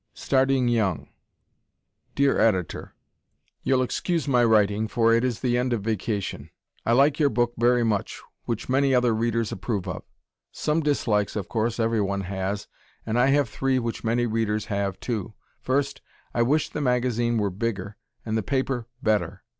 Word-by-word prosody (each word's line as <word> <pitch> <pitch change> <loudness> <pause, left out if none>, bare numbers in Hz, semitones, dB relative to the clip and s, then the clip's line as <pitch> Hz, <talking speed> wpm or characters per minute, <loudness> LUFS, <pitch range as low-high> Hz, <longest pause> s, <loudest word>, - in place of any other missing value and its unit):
Starting 135 -1 +2
Young 110 -7 0 1.1
Dear 140 0 +3
Editor: 95 -7 0 0.7
You'll 130 -1 +2
excuse 165 +4 -1
my 125 -3 +3
writing, 110 -1 +3
for 115 0 +3
it 115 +1 +3
is 125 -3 -1
the 120 -1 +1
end 125 0 0
of 110 -4 -2
vacation. 105 -2 -3 0.4
I 115 - +4
like 140 +4 +4
your 145 -2 +4
book 120 0 0
very 120 +1 +3
much, 105 -3 -1 0.3
which 115 -2 -3
many 135 +1 +3
other 125 -2 +3
readers 115 0 0
approve 100 0 -3
of. - - -4 0.5
Some 155 +2 0
dislikes, 115 -9 0
of 105 - -3
course, 115 +1 -1
everyone 105 -4 0
has, 95 +2 -3 0.4
and 115 +2 0
I 125 - +4
have 140 -1 +3
three 135 +3 0
which 115 -2 -3
many 120 +1 +1
readers 110 -2 -1
have, 100 -1 -2
too. 110 -3 -4 0.3
First, 140 +1 -1 0.3
I 120 - +1
wish 145 +6 +2
the 150 - -4
magazine 120 -2 +1
were 100 -2 0
bigger 100 0 -3 0.3
and 110 -1 -2
the 110 - +1
paper 130 0 -1 0.2
better. 110 -2 0
115 Hz, 160 wpm, -25 LUFS, 105-130 Hz, 1.1 s, I